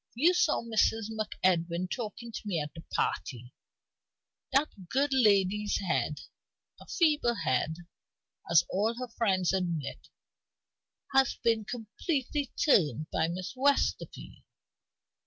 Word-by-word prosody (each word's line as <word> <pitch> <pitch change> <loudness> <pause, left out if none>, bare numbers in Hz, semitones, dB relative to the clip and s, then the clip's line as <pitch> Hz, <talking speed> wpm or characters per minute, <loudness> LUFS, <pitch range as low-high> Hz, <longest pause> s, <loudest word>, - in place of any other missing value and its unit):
You 320 +9 +4
saw 350 -8 +2
Mrs. 225 -1 +1
MacEdwin 185 -5 0
talking 235 0 -5
to - - -6
me 180 -5 0
at 150 0 -5
the 165 - -9
party. 120 -1 -2 1.0
That 265 - -1
good 280 +2 +1
lady's 210 -4 +3
head 155 -6 -1 0.6
a - - -14
feeble 300 -9 +2
head, 160 - 0 0.7
as 170 0 +6
all 215 +5 0
her 250 0 -6
friends 190 -6 +1
admit 170 -6 -3 1.1
has 270 -1 +4
been 225 -2 +2
completely 255 - -3
turned 155 - +2
by 160 - +1
Miss 180 +2 -5
Westerfield. 280 +2 0
210 Hz, 115 wpm, -30 LUFS, 175-250 Hz, 1.1 s, as